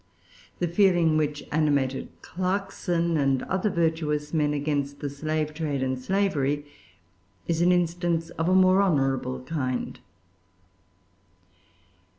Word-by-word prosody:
The 175 - 0
feeling 175 -3 +3
which 150 -1 -1
animated 145 -4 +1 0.2
Clarkson 180 -2 -1
and 135 -2 +1
other 190 +3 0
virtuous 160 -4 -1
men 150 -2 +2
against 145 -1 -2
the 145 - -4
slave 155 +1 -2
trade 150 -4 -2
and 130 -1 -2
slavery 145 -5 0 0.8
is 170 0 0
an 175 +1 +5
instance 170 -1 0
of 165 +1 -1
a 185 - +4
more 185 +1 +5
honorable 135 -7 0
kind. 130 -3 -3
155 Hz, 115 wpm, -26 LUFS, 145-175 Hz, 0.8 s, an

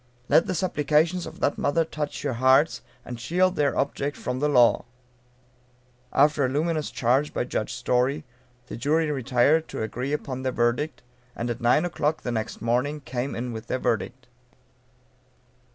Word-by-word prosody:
Let 165 - +5
the - - -1
supplications 165 +1 +1
of - - -11
that - - +1
mother 165 +3 +1
touch 150 -2 -5
your 140 -3 -1
hearts, 130 +6 +3 0.2
and 120 -1 -7
shield 180 +9 +1
their 145 -2 +1
object 140 +1 -1
from 125 0 -3
the 150 +2 +1
law. 120 -4 +4 1.3
After 145 +1 +3
a 130 - +2
luminous 155 +2 -1
charge 130 +5 +1
by - - +1
Judge 120 -2 -3
Story, 125 +5 0 0.4
the - - -7
jury 150 +4 +1
retired 135 +4 +2
to - - -4
agree 125 +5 -4
upon 135 -3 -3
their 130 0 -1
verdict, 125 +6 -1 0.3
and 120 +1 -2
at 120 +1 -6
9 125 +8 +3
o'clock 160 -2 -1
the 120 - -2
next 110 -1 -4
morning 125 +6 0
came 130 0 -4
in 120 +1 -4
with 110 +1 -7
their - - -1
verdict. 120 +2 -2
135 Hz, 165 wpm, -25 LUFS, 120-150 Hz, 1.3 s, Let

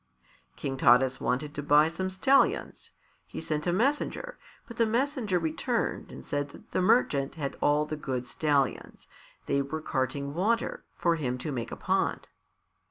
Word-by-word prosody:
King 135 -1 -4
Taras 130 +1 +4
wanted 145 +4 -1
to 145 - -4
buy 145 +2 +5
some 185 +3 -3
stallions. 265 +9 +2 0.4
He - - -7
sent 155 0 -2
a - - +3
messenger, 290 - -1 0.3
but 235 -3 -10
the 230 - +3
messenger 240 - 0
returned 175 +9 -2
and - - -10
said 145 0 -2
that - - -15
the - - +1
merchant 145 - +2
had 140 -4 -4
all 150 +1 +3
the 155 0 -4
good 130 -4 -3
stallions; 140 0 -1 0.4
they 140 - +1
were 140 +3 -4
carting 140 -1 -2
water 220 +8 0
for 170 -1 +1
him 125 -5 -2
to 145 +4 -4
make 120 -4 -4
a - - -4
pond. - - 0
155 Hz, 165 wpm, -28 LUFS, 140-190 Hz, 0.4 s, buy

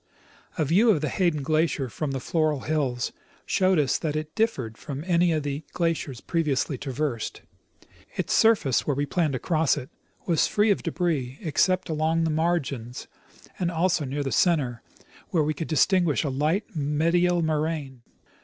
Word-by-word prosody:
A 155 - +1
view 195 - +4
of 185 -9 +3
the 150 - -1
Hayden 170 -5 0
glacier 155 -2 +1
from 145 +5 -4
the 135 -1 -2
Floral 155 0 0
hills 135 -6 -1 0.3
showed 185 -1 +2
us 145 -3 +2
that 155 -3 -2
it 155 0 -4
differed 135 - -1
from 140 +4 -6
any 175 -1 +3
of 155 -2 0
the 145 +1 -3
glaciers 165 -7 -1
previously 150 -4 0
traversed. 130 -2 -3 0.7
Its - - -1
surface, 215 - +3
where 145 - +1
we 145 +1 0
planned 155 -1 0
to - - 0
cross 160 +1 +1
it, 130 -3 -7 0.3
was 165 -4 +2
free 210 +1 +2
of 200 - +1
debris 155 -7 -2
except 185 +2 +1
along 160 +1 +1
the 160 - +1
margins 145 -7 -1 0.5
and 175 -2 0
also 170 -1 +1
near 140 +2 -3
the 135 - -3
center, 140 -10 +1 0.5
where 165 -4 +2
we 155 +1 0
could 155 +2 -5
distinguish 170 +1 +2
a 145 - -1
light 155 +10 -1
medial 165 +4 +2
moraine. 155 -4 -2
155 Hz, 165 wpm, -26 LUFS, 140-170 Hz, 0.7 s, view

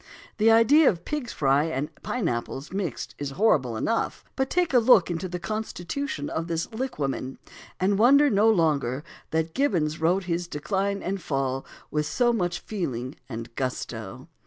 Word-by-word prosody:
The 220 +1 +4
idea 255 +7 +6
of 170 -4 -3
pig's 295 -5 -3
fry 140 +1 +2
and 150 -1 -3
pine 240 -8 -2
apples 125 +3 -3
mixed 190 - -3
is 145 -1 -3
horrible 140 - +2
enough; 230 - -1
but 265 0 0
take 355 -4 +1
a 250 - +7
look 225 -7 +5
into 175 +2 -3
the 180 - -3
constitution 200 - -4
of 165 +1 -3
this 165 -1 -1
liquamen, 145 - -3 0.4
and 195 +2 +2
wonder 280 +6 +6
no 210 +3 +4
longer 150 - +1 0.3
that 160 0 -1
Gibbons 165 - 0
wrote 180 +4 +2
his 175 -1 -2
Decline 195 +6 -2
and 190 +1 -2
Fall 135 -3 -2 0.2
with 150 0 0
so 240 +5 +2
much 175 -5 -1
feeling 130 - -4 0.2
and 115 -1 -6
gusto. 130 -1 -4
175 Hz, 160 wpm, -26 LUFS, 145-220 Hz, 0.4 s, a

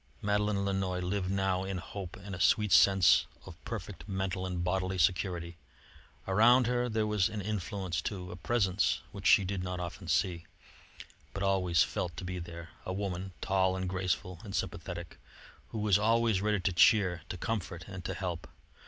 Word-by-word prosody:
Madeleine 105 -1 0
Lannoy 95 -2 -1
lived 90 +1 -2
now 95 -1 0
in 95 -1 -3
hope 90 0 -7
and 95 0 -9
a 90 - -5
sweet 105 +3 +3
sense 95 -3 +6 0.2
of 95 -2 -12
perfect 105 -3 -7
mental 95 -1 -2
and 90 -1 -3
bodily 95 +1 -1
security. 85 -1 0 0.7
Around 120 +6 +5
her 125 +1 0
there 110 -1 0
was 105 -3 +2
an 105 - -5
influence, 95 -3 -3
too, 90 -1 -5
a - - -6
presence 95 -1 +1
which 95 -3 -3
she 95 +3 +6
did 95 0 -2
not 90 0 -4
often 90 +1 -6
see, 85 -1 0 0.9
but 100 - -2
always 90 -5 +3
felt 85 -4 -3
to - - -5
be 90 0 -4
there: 85 0 -8
a - - -4
woman, 95 -1 -4
tall 95 -1 +2
and 95 0 -3
graceful 90 -1 -2
and 100 -2 -6
sympathetic, 85 -2 -5 0.5
who - - -6
was 105 -3 +3
always 115 -2 +2
ready 105 0 +1
to 95 0 0
cheer, 90 -1 +4
to 90 - -4
comfort, 90 -5 -4
and 95 -2 -7
to - - -3
help. 90 -3 -4
95 Hz, 175 wpm, -31 LUFS, 90-100 Hz, 0.9 s, sense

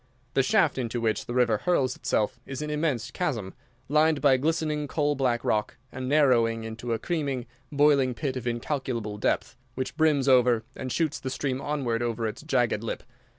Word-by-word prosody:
The 135 - +4
shaft 165 -2 +2
into 120 -1 -2
which 110 -2 -1
the 120 - -4
river 120 -4 +3
hurls 140 -8 +1
itself 110 +3 -1
is 135 +2 -4
an 150 - -4
immense 145 -7 -1
chasm, 115 - -2 0.3
lined 155 +1 +3
by 135 -2 +5
glistening 150 0 -1
coal 145 0 +1
black 125 -4 0
rock, 105 -1 0
and 130 0 -5
narrowing 120 -6 +3
into 115 +2 -5
a - - 0
creaming, 140 -5 -2 0.3
boiling 140 -3 +3
pit 130 +3 -2
of 125 -1 -4
incalculable 120 -3 -3
depth, - - 0 0.2
which 130 0 -3
brims 150 -4 +3
over 125 -3 +4
and 130 - -5
shoots 155 +2 0
the 130 - -4
stream 130 0 -2
onward 135 -6 -1
over 115 -1 -1
its 110 - -4
jagged - - +1
lip. - - -4
130 Hz, 180 wpm, -27 LUFS, 120-150 Hz, 0.3 s, by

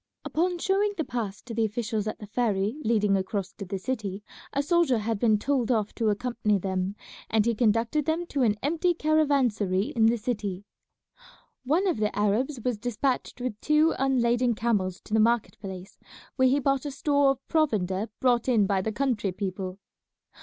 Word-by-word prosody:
Upon 355 +3 0
showing 400 +3 +1
the 320 - 0
pass 220 -7 -4
to 235 - -8
the 225 0 +1
officials 220 -1 -2
at 215 - -3
the 210 - -9
ferry 215 +2 -1
leading 210 -3 +2
across 195 0 -2
to 200 - -7
the 195 +2 -4
city 205 -2 -4 0.3
a 280 - 0
soldier 335 -5 +3
had 220 0 -2
been 220 -2 +4
told 255 +1 0
off 220 -4 0
to 225 -2 0
accompany 215 -1 0
them, 190 +1 -2 0.3
and 220 -1 +2
he 235 - +2
conducted 230 +6 +1
them 325 +3 0
to 285 -5 -2
an 220 -4 +3
empty 335 +4 +1
caravansary 265 - +1
in 225 -1 +5
the 235 +1 +3
city. 205 -4 -3 1.0
One 320 +9 +2
of 355 - +1
the 210 -1 -1
Arabs 225 +7 +1
was 245 -4 0
despatched 245 +3 -2
with 230 -4 -4
two 305 +1 +3
unladen 245 -2 +2
camels 200 -5 -1
to 215 - -9
the 220 - +4
market 230 -1 +1
place, 190 -1 -9 0.4
where 260 -1 +4
he 270 +3 +3
bought 275 +1 0
a - - -2
store 285 0 +2
of 270 -1 -2
provender 215 - 0
brought 245 -1 +2
in 220 -5 +4
by 195 -1 +1
the 220 - -2
country 220 -5 0
people. 185 -1 -4
230 Hz, 180 wpm, -27 LUFS, 205-270 Hz, 1.0 s, in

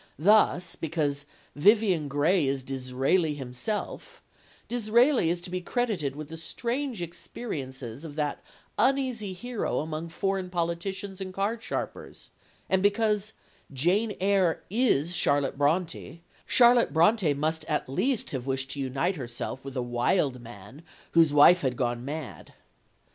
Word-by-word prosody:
Thus, 180 -1 +3
because 145 -3 -2 0.3
"Vivian 190 -2 +3
Grey 145 +3 +2
is 135 -1 -1
Disraeli 135 +5 0
himself," 135 - -5 0.4
Disraeli 240 - +3
is 175 +1 -1
to 180 0 -7
be 185 0 -2
credited 180 - -1
with 155 0 -7
the 165 - -7
strange 235 - -3
experiences 135 - -6
of 150 -3 -8
that 150 -2 -2 0.4
uneasy 255 -7 +1
hero 240 +5 -3
among 160 +2 -3
foreign 195 +1 -2
politicians 185 +3 -3
and 190 -1 -5
card 205 +5 -2
sharpers; - - -6 0.4
and 190 0 +2
because 210 +1 +1 0.4
"Jane 185 - +1
Eyre 190 -3 +2
is 180 - +2
Charlotte 140 -4 +1
Brontë," 165 +2 -1 0.3
Charlotte 240 -1 +5
Brontë 170 -2 +3
must 155 +2 -1
at 150 - -1
least 230 - 0
have 130 -1 -4
wished 135 0 -1
to 145 - -5
unite 135 +8 -1
herself 125 0 -5
with 135 -1 -7
a 125 - 0
wild 125 +2 0
man 115 +4 -12 0.3
whose 165 -3 +5
wife 150 +5 +7
had 130 -3 -1
gone 120 -1 -1
mad. 145 +1 -7
165 Hz, 135 wpm, -27 LUFS, 140-200 Hz, 0.4 s, wife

